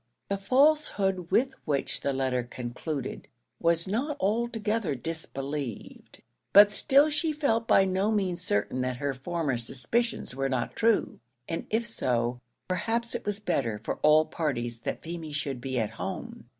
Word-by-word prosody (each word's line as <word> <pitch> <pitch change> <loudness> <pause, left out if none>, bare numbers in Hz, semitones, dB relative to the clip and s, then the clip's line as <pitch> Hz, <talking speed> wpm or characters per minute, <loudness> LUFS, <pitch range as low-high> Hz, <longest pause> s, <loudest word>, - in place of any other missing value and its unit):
The 200 - 0
falsehood 200 - +2
with 265 +2 +2
which 145 -3 -1
the 140 - 0
letter 130 -2 0
concluded 125 +4 -5 0.3
was 170 0 +2
not 260 +10 -1
altogether 220 - 0
disbelieved; 140 -3 -5 0.3
but 205 +1 +9
still 285 +7 +4
she 310 +2 +1
felt 255 -7 0
by 195 - +6
no 190 +3 +1
means 185 -5 0
certain 125 -2 0
that 125 -1 -1
her 140 +1 -1
former 140 0 -2
suspicions 135 - -1
were 135 0 0
not 130 -3 -2
true, 230 -1 +2 0.3
and 165 - -4
if 225 +2 +1
so, 125 - -1 0.3
perhaps 230 +6 -1
it - - -4
was 205 0 -1
better 115 - -1
for - - -2
all 155 +1 +5
parties 120 -8 -2
that - - -4
Feemy 165 -2 -6
should 140 -3 -2
be 130 0 -3
at 110 -3 0
home. - - -6
170 Hz, 150 wpm, -28 LUFS, 135-220 Hz, 0.3 s, but